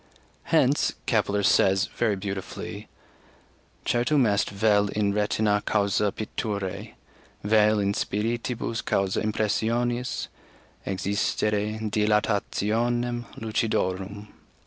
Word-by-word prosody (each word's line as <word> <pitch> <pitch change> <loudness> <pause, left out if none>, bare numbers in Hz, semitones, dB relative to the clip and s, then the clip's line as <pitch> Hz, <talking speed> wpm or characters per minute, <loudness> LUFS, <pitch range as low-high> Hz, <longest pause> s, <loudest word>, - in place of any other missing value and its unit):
Hence - - +3
Kepler 100 0 +1
says 95 +1 +4
very 115 -4 +1
beautifully: 95 -1 -6 1.0
"Certum 125 +3 +2
est 100 -2 +1
vel 105 0 +3
in 100 0 0
retinâ 105 0 +1
caussâ 100 0 +1
picturæ, 100 -3 -4 0.5
vel 105 0 +4
in 100 -1 +1
spiritibus 115 +2 -2
caussâ 95 -1 0
impressionis, 115 +3 0 0.6
exsistere 100 +2 0
dilatationem 110 +3 0
lucidorum." 105 -2 -2
105 Hz, 80 wpm, -26 LUFS, 100-115 Hz, 1.0 s, says